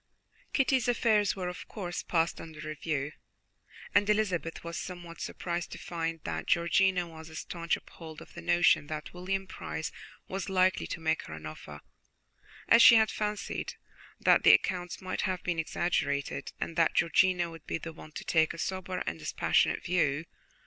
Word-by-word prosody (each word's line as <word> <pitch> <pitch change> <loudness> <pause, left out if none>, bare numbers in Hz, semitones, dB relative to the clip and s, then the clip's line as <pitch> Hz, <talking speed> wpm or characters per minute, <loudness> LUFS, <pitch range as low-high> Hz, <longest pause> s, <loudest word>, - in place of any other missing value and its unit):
Kitty's 265 -2 +2
affairs 220 -4 +3
were, 185 -2 -3
of 180 - -6
course, 180 -5 -4
passed 165 -1 0
under 160 -2 -10
review, 150 -2 -2 0.8
and 205 - +4
Elizabeth 190 -6 0
was 170 0 -5
somewhat 175 -2 -8
surprised 175 -1 -3
to - - -7
find 165 -1 -3
that - - -4
Georgiana 180 +1 +3
was 160 -1 -11
a 160 - -11
staunch 170 +1 -2
upholder 160 -2 -11
of - - -18
the - - -8
notion 175 -4 +4
that 155 0 -6
William 190 +2 -2
Price 185 - -5 0.4
was 195 0 -4
likely 185 0 +2
to - - -4
make 160 0 +1
her 80 - -7
an 80 0 -10
offer, 75 -1 -9 0.9
as 230 - +7
she 235 - +10
had 220 -1 +5
fancied 210 -1 -3 0.4
that - - +5
the - - +9
accounts 180 -1 +1
might 185 - -2
have 185 -3 -1
been 175 -2 -1
exaggerated, 145 -4 -1
and 165 - -3
that 165 -1 +3
Georgiana 175 +1 +3
would 165 -1 -12
be - - -1
the 165 0 -7
one 155 - -12
to - - -7
take 160 -1 +2
a - - -10
sober 185 +1 -3
and 80 +1 -3
dispassionate 75 - +1
view. 165 -3 +1
175 Hz, 170 wpm, -30 LUFS, 160-185 Hz, 0.9 s, she